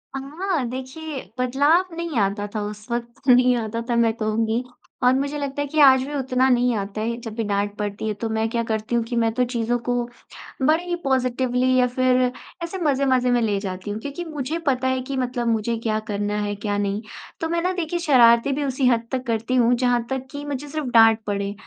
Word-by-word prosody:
अ, - - -2 0.2
हाँ। 370 -8 0
देखिए 265 +3 -6 0.2
बदलाव 295 +8 +2
नहीं 335 -6 -3
आता 205 +1 0
था 210 - -1
उस 210 0 -8
वक़्त, 240 +3 -5
नहीं 250 0 +6
आता 230 0 -3
था 240 - +1
मैं 230 -1 +3
कहूँगी। 225 +1 -1 0.4
और 250 - +5
मुझे 280 +2 -1
लगता 280 0 -3
है 290 - -2
कि 310 +2 -2
आज 265 -2 +7
भी 295 - -6
उतना 260 -1 +1
नहीं 245 -1 +3
आता 200 +1 -4
है। 230 +2 -1
जब 225 -2 -7
भी 230 - -1
डाँट 205 0 -1
पड़ती 210 +1 -3
है 215 - 0
तो 230 - 0
मैं 220 0 +1
क्या 235 0 -1
करती 220 +1 -2
हूँ 235 - +2
कि 240 - -4
मैं 225 - +2
तो 250 +2 +1
चीज़ों 240 -1 -1
को 245 - +1 0.7
बड़े 310 +5 +3
ही 355 0 -2
पॉज़िटिवली 255 -1 +1
या 250 0 +4
फ़िर 255 0 +2 0.4
ऐसे 340 +3 -4
मज़े-मज़े 260 -4 +2
में 240 -1 +3
ले 205 -3 +1
जाती 190 0 -5
हूँ। 215 - -4
क्योंकि 285 +6 -5
मुझे 310 0 -4
पता 260 -1 +1
है 260 0 0
कि 270 - -2
मतलब 245 -2 -1
मुझे 230 +1 0
क्या 215 -1 0
करना 205 0 -1
है 205 0 -2
क्या 205 0 -2
नहीं। 205 +1 -1 0.4
तो 325 - -1
मैं 335 0 0
ना 365 - 0
देखिए 345 -1 -2
शरारतें 250 -4 +5
भी 295 - -1
उसी 265 -1 +1
हद 235 -2 +2
तक 255 -1 -2
करती 230 +2 -1
हूँ 240 0 +4
जहाँ 245 -1 +3
तक 265 -1 -3
कि 285 0 -6
मुझे 290 0 -4
सिर्फ़ 305 -2 -3
डाँट 225 -1 +7
पड़े। 200 0 -2
250 Hz, 225 wpm, -23 LUFS, 225-275 Hz, 0.7 s, आज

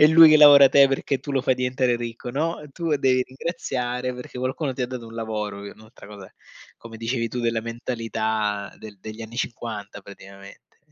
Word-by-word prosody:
è 150 - +9
lui 160 0 +8
che 155 - +6
lavora 145 -2 +9
te 140 0 +6
perché 135 0 -1
tu 135 - -9
lo 135 -2 0
fai 130 - +2
diventare 125 0 0
ricco, 120 0 -6
no, 155 +5 -2
tu 160 0 -1
devi 130 -2 +2
ringraziare 125 -3 -4
perché 125 0 -9
qualcuno 130 +3 -2
ti 130 - -8
ha 125 - 0
dato 125 -2 -7
un 115 - -12
lavoro, 105 -3 -4
un'altra 110 +3 -13
cosa, 100 -2 -12 0.5
come 115 -1 -11
dicevi 115 +1 -2
tu, 125 - -4
della 115 -1 0
mentalità 110 -3 -3
del 105 -2 -12
degli 110 +3 -9
anni 115 +1 -9
50 110 -4 -5
praticamente. 100 0 -15
120 Hz, 185 wpm, -23 LUFS, 110-135 Hz, 0.5 s, è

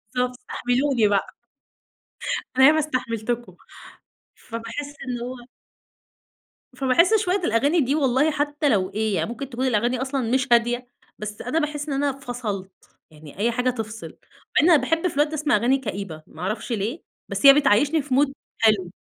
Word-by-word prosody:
بالضبط، 250 0 0
استحملوني 250 -1 0
بقى. 200 -1 0 1.2
أنا 265 - +8
ياما 315 +1 +5
استحملتكم. 240 -5 -3 0.8
فباحس 230 +5 -7
إن 245 -1 -3
هو 255 +1 -5 1.4
فباحس 280 - +3
شوية 365 -1 +1
الأغاني 290 - +2
دي 275 +2 +1
والله 275 +1 +2
حتى 290 0 0
لو 190 -5 +1
إيه، 215 -1 -1
يعني - - -1
ممكن 260 +3 -6
تكون 255 +1 -2
الأغاني 240 +2 +1
أصلًا 265 -3 -2
مش 260 +1 +1
هادية، 240 +1 +2 0.3
بس 210 0 -6
أنا 255 +7 -1
باحس 300 -1 -3
إن - - -1
أنا 285 - +2
فصَلت، 220 -7 -5 0.4
يعني 150 0 -14
أي 230 +3 +2
حاجة 250 +2 0
تفصِل، 225 -2 -5
مع - - -29
إن 330 - +4
أنا 325 - +7
باحب 325 +2 0
في - - -4
الوقت 295 +2 +3
ده 310 - -10
أسمَع 300 -6 +1
أغاني 245 +5 +2
كئيبة 195 -10 -6
ما 160 - -12
أعرفش 210 +6 -3
ليه، 225 - -3 0.3
بس - - -2
هي 275 - +11
بتعيّشني 290 +2 +3
في 270 -2 -2
mood 280 +1 +3 0.3
حلو 205 -6 +2
250 Hz, 165 wpm, -23 LUFS, 225-285 Hz, 1.4 s, هي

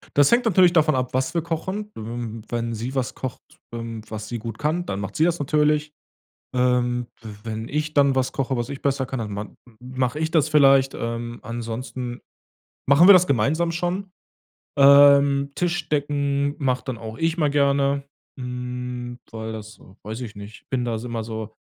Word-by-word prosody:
Das 145 -1 +5
hängt 240 +1 +4
natürlich 185 -4 +5
davon 155 -3 +3
ab, 130 -1 -2
was 130 +1 0
wir 170 - +1
kochen. 190 +6 -4
W 115 0 -6
wenn 115 -1 -2
sie 120 +5 -5
was 130 -2 -2
kocht, 130 -2 -5 0.3
ähm, 115 -1 -5
was 110 0 -6
sie 120 - -4
gut 110 -1 -6
kann, 160 +4 -1
dann 100 - -3
macht 100 +1 -5
sie 160 - +4
das 175 0 +1
natürlich. 150 +1 +1 0.6
Ähm, 125 -1 +1 0.2
w 110 - -8 0.2
wenn 110 0 -5
ich 155 +1 -2
dann 140 -2 +4
was 130 0 0
koche, 135 -1 -1
was 120 0 -2
ich 140 -1 -7
besser 135 -2 0
kann, 130 +1 -4
dann 110 -3 -4
man 105 +1 -6 0.2
mach 125 0 -2
ich 160 +1 -1
das 155 -2 +2
vielleicht. 135 -3 +5
Ähm, 115 0 -4
ansonsten 120 +2 -5 0.7
machen 145 +7 +6
wir 200 - +11
das 180 0 +6
gemeinsam 155 +7 +1
schon. 180 +3 -2 0.7
Ähm, 140 0 +6
Tisch 175 -2 -1
decken 145 -1 0
mach 130 -3 0
dann 130 -4 -5
auch 110 0 -8
ich 165 0 0
mal 150 -4 +2
gerne, 140 -1 +2 0.3
hm, 125 -1 -5
weil 110 0 -5
das 110 0 -9 0.2
weiß 110 +3 -6
ich 110 -4 -7
nicht 100 +1 -11
bin 130 -2 0
das 115 -2 -2
immer 115 -2 -4
so 110 -1 -6
130 Hz, 185 wpm, -23 LUFS, 115-150 Hz, 0.7 s, wir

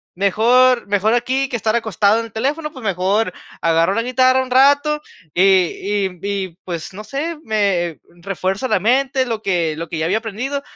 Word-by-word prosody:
mejor 235 +6 +3
mejor 205 +3 +1
aquí 260 +3 0
que - - -3
estar 220 -1 0
acostado 220 -1 +2
en 230 - -4
el 225 - -14
teléfono, 295 +7 -2
pues 260 - -11
mejor 195 +1 0 0.3
agarro 165 +3 +2
la 230 - 0
guitarra 255 +1 +3
un 255 - -10
rato". 285 +3 +4 0.3
Y 180 - +3 0.6
y 180 -2 -12
y 195 -4 -4
pues 170 0 -6
no 210 +2 -8
sé, 305 +7 -4
me 195 -7 0 0.2
refuerzo 195 +5 -2
la 190 - +1
mente, 260 +5 +1
lo 225 -3 -3
que 170 -6 0
lo 165 0 -5
que 165 - -4
ya 155 - -1
había 195 +6 +1
aprendido, 245 +6 -4
220 Hz, 185 wpm, -19 LUFS, 190-255 Hz, 0.6 s, rato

